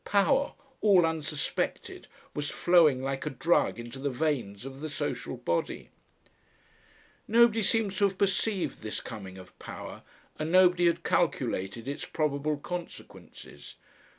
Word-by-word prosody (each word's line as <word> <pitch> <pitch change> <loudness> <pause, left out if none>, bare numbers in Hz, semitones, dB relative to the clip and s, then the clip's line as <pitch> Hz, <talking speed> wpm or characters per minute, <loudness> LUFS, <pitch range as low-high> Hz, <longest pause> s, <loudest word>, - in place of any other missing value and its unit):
"Power," 265 +8 +2 0.3
all 195 -5 +6
unsuspected, 155 -2 -3 0.3
was 145 0 -3
flowing 160 -7 +4
like 135 +2 -3
a - - +1
drug 160 +2 +2
into 120 +3 -8
the 140 +1 -1
veins 125 -7 -2
of 135 0 -8
the 155 +2 -5
social 145 - -4
body. 85 - -2 1.4
Nobody 230 0 +5
seems 210 -2 +1
to 200 - +4
have 195 -1 -1
perceived 195 0 0
this 110 -1 -3
coming 95 -5 -8
of 95 -1 -13
power, - - -8 0.4
and 155 +1 -2
nobody 180 -1 +5
had 170 0 +1
calculated 120 - 0
its 140 - -4
probable 150 -1 -1
consequences. 175 +4 -9
155 Hz, 130 wpm, -29 LUFS, 135-185 Hz, 1.4 s, all